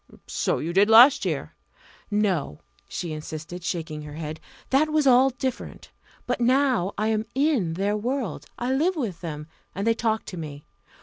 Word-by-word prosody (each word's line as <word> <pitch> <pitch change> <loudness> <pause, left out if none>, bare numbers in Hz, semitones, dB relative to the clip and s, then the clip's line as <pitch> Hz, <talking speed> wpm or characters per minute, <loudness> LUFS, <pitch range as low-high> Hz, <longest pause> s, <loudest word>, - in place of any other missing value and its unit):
"So - - -1
you 165 +3 -3
did 200 +3 +4
last 245 +5 +8
year." - - -3 0.6
"No!" 195 - 0 0.3
she 170 -3 -4
insisted, 155 +3 -7
shaking 160 -3 -4
her 150 0 -9
head 155 0 -6 0.3
"that 290 +4 +3
was 305 -1 +2
all 260 0 +6
different. 260 0 -5 0.3
But 245 0 -2
now 255 -6 +2
I 215 +2 0
am 215 -1 +1
in 265 - +1
their 200 +3 0
world 220 - -3
I 245 +2 -1
live 335 +8 +1
with 215 - -4
them 150 -3 -5 0.3
and 200 +2 -2
they 230 - +4
talk 225 -1 -1
to 180 - -7
me. 150 -3 -7
210 Hz, 170 wpm, -25 LUFS, 165-255 Hz, 0.6 s, last